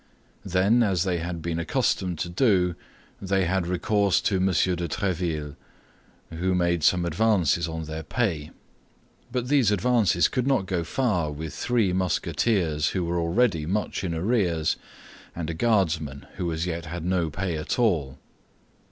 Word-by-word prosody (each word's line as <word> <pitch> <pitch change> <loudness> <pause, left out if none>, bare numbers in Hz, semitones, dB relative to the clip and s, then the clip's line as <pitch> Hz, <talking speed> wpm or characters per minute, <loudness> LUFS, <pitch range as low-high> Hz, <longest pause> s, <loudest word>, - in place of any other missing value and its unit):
Then, 100 +5 +3
as 95 -6 +2
they 90 -3 -1
had 85 -1 -5
been 85 -1 -2
accustomed 85 +1 0
to 85 - -3
do, 90 -3 +2 0.5
they 95 -1 +1
had 90 0 0
recourse 100 +2 +2
to 100 - +1
M. 95 +1 +2
de - - +2 0.4
Tréville, 80 -5 -2 0.8
who 90 +3 -1
made 85 -1 +1
some 90 +2 +3
advances 90 -2 +2
on 80 0 -4
their 80 0 -5
pay; 80 -4 -2 0.8
but 125 0 -2
these 135 -6 +3
advances 105 -3 +3
could 125 0 -1
not 135 -8 +2
go 90 -3 -1
far 90 - 0
with 75 0 -6
three 115 -1 +1
Musketeers 90 -3 0
who 90 - 0
were 85 +1 -1
already 85 -1 +1
much 100 0 -2
in 85 -3 -2
arrears 85 -4 +1 0.6
and 85 -1 -3
a - - -4
Guardsman 80 - 0
who 85 -2 -2
as 80 +1 -2
yet 85 -1 -4
had 85 +1 -5
no 90 -3 +1
pay 90 +2 -3
at 75 -1 -3
all. 80 - +1
90 Hz, 155 wpm, -25 LUFS, 80-100 Hz, 0.8 s, Then